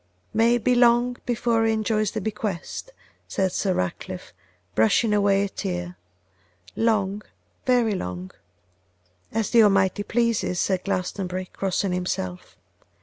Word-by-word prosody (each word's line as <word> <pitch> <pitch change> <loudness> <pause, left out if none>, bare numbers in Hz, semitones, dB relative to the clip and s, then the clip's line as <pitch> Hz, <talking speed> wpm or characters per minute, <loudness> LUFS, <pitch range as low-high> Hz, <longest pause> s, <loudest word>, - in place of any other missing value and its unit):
'May 230 +2 +4
it 240 - -2
be 250 - +4
long 240 0 +4
before 235 -1 +1
he 225 - +3
enjoys 215 -1 +1
the 220 - -4
'bequest,' 210 - -4 0.4
said 190 -1 0
Sir 190 0 0
Ratcliffe, 90 -1 -4 0.4
brushing 110 - +3
away 200 -1 +3
a 200 - -2
tear; 90 - -4 0.8
'long, 210 -3 +1 0.5
very 245 -4 +3
long.' 90 - -5 1.0
'As 225 -1 -1
the 235 - +7
Almighty 195 -2 +3
pleases,' 230 -4 0
said 190 -2 0
Glastonbury, 185 -1 -2
crossing 195 0 -1
himself. 180 - -3
205 Hz, 125 wpm, -24 LUFS, 185-225 Hz, 1.0 s, the